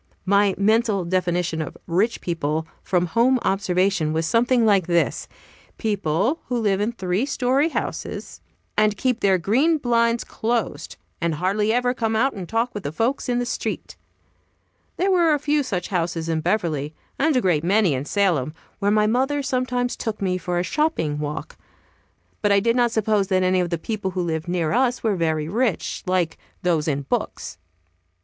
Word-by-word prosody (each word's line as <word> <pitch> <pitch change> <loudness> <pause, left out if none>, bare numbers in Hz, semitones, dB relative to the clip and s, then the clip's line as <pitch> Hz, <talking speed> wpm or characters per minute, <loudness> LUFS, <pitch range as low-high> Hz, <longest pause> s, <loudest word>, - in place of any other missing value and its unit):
My 200 0 +3
mental 215 -2 +2
definition 175 -2 0
of 155 - -6
"rich 200 +7 0
people," 160 -2 -2 0.2
from 180 -1 +1
home 235 +9 +3
observation, 190 -4 +1
was 160 +1 0
something 235 +5 +3
like 195 -5 +3
this: 170 -1 +1 0.5
People 205 - 0
who 250 - -1
live 205 -3 +1
in 215 +3 0
three 190 0 -1
story 275 +2 +1
houses, - - -5 0.3
and 215 -1 +2
keep 250 0 0
their 195 -2 +3
green 260 - +2
blinds 235 -3 +1
closed, 220 -10 -3 0.3
and 170 -2 0
hardly 200 +6 +1
ever 245 +1 +1
come 225 -3 -1
out 265 +5 +2
and 185 -4 -7
talk 230 +2 0
with 205 - -5
the 145 - -4
folks 235 - -1
in 245 - +1
the 245 - 0
street. 245 - -4 1.0
There 385 +2 +2
were 340 -4 +4
a - - 0
few 295 +1 +1
such 195 -10 -3
houses 170 -3 -1
in 160 -1 0
Beverly, 155 -5 -1 0.2
and 305 +1 +2
a - - +5
great 170 -6 +1
many 195 -2 +3
in 130 +1 -3
Salem, 165 -7 +1 0.2
where 200 -1 +1
my 210 0 +3
mother 265 +6 +1
sometimes 250 -1 -1
took 220 -3 -4
me 185 -2 -1
for 175 0 -2
a 175 - +1
shopping 180 - 0
walk. 150 +1 -5 0.8
But 205 - +2
I 200 - +5
did 230 +3 +1
not 240 -1 +3
suppose 215 -3 +1
that 185 -1 +2
any 185 0 +2
of 175 -1 0
the 170 - -1
people 205 +3 -3
who 185 -1 -2
lived 160 0 -3
near 175 -3 0
us 250 +1 +1
were 220 -3 +1
very 160 -3 0
rich, 220 +1 -1
like 180 -3 0 0.2
those 165 -4 +1
in 140 -2 -1
books. - - -3
200 Hz, 180 wpm, -23 LUFS, 175-235 Hz, 1.0 s, a